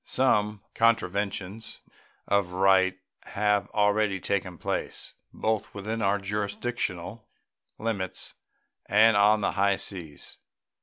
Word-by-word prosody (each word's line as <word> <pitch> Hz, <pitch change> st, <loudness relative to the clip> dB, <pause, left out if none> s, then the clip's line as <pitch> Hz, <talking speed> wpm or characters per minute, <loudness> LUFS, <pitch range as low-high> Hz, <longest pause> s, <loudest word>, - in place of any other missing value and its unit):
Some 105 Hz, -5 st, +1 dB
contraventions 105 Hz, -2 st, 0 dB, 0.5 s
of 100 Hz, -3 st, +1 dB
right 95 Hz, 0 st, +4 dB, 0.3 s
have 105 Hz, 0 st, +1 dB
already 105 Hz, -1 st, +2 dB
taken 95 Hz, -2 st, -2 dB
place, -, -, -3 dB, 0.2 s
both 110 Hz, -2 st, -2 dB
within 110 Hz, +3 st, -3 dB
our 100 Hz, 0 st, +2 dB
jurisdictional 100 Hz, 0 st, -3 dB, 0.5 s
limits 105 Hz, -5 st, -3 dB, 0.5 s
and 110 Hz, +2 st, +5 dB
on 105 Hz, +1 st, +5 dB
the -, -, +1 dB
high 100 Hz, 0 st, +2 dB
seas. 85 Hz, -7 st, -4 dB
100 Hz, 100 wpm, -27 LUFS, 95-110 Hz, 0.5 s, and